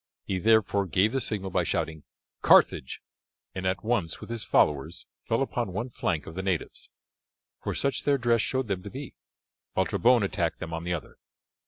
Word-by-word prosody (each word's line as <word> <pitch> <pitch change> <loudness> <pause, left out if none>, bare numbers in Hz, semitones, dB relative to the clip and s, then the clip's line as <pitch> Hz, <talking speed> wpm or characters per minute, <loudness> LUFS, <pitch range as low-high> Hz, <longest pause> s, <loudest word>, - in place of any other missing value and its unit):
He 95 -2 -2
therefore 105 -1 +3
gave 95 +5 +3
the 135 +1 0
signal 100 -4 -3
by - - +2
shouting 80 -1 -2 0.4
"Carthage," 65 - +4 0.5
and 95 0 -3
at 95 -1 -1
once 105 -9 -1
with - - -9
his 115 -2 -3
followers 75 +4 +1 0.2
fell 115 +4 0
upon 120 -7 -3
one 115 +7 -3
flank 80 -9 -1
of 80 - -8
the 95 - -4
natives, 95 -3 -3 0.7
for - - -3
such 140 -1 0
their 140 -1 +3
dress 120 -2 +2
showed 130 0 -1
them 95 -3 -2
to 100 - -8
be, 135 +5 -8 0.6
while - - +2
Trebon 120 -2 +3
attacked 100 - -1
them 80 - -6
on 80 +1 -4
the 90 - -1
other. 80 - -9
100 Hz, 185 wpm, -27 LUFS, 90-115 Hz, 0.7 s, Carthage